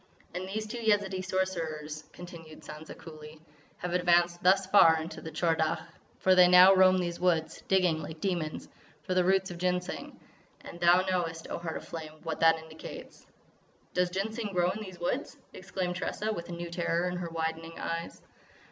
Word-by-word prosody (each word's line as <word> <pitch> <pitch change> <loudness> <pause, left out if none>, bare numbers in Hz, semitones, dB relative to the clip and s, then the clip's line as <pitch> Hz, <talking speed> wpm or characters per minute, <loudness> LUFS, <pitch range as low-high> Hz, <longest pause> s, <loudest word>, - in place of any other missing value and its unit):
"And 185 +1 -5
these 215 +2 -3
two 235 +3 -6
Yezidee 205 -4 +1
Sorcerers," 160 -5 -3
continued 170 -3 -11
Sansa 155 +1 -10
coolly, 155 -1 -11 0.4
"have 180 -1 -4
advanced 175 -1 +3
thus 190 +2 +4
far 165 -4 +6
in 160 +1 -5
the 160 - -8
Tchor 165 +1 +1
Dagh; 160 -1 0 0.4
for 185 - +4
they 180 -1 +7
now 180 +2 +8
roam 185 0 +6
these 175 -1 -2
woods, 170 -3 0
digging 180 -4 +2
like 155 +1 -8
demons, 170 -4 -2 0.4
for 185 - -2
the 185 0 +3
roots 190 0 +2
of 170 - -8
Ginseng; 180 0 -2 0.4
and 170 - -10
thou 175 +1 +5
knowest, 175 -3 -2
O - - -3
Heart 165 -2 -4
of - - -10
Flame, 160 -2 -7
what 160 -1 -4
that 165 0 +5
indicates." 160 0 -11 0.7
"Does 180 0 +1
Ginseng 210 +3 -3
grow 180 0 +2
in 210 +3 -6
these 185 -4 -9
woods!" 255 +11 -3 0.2
exclaimed 180 -1 -4
Tressa 215 +4 -2
with 170 -4 -7
a - - -6
new 170 0 -6
terror 170 0 0
in 180 0 -3
her 175 -1 -4
widening 165 0 -4
eyes. 165 0 -5
175 Hz, 180 wpm, -29 LUFS, 165-185 Hz, 0.7 s, now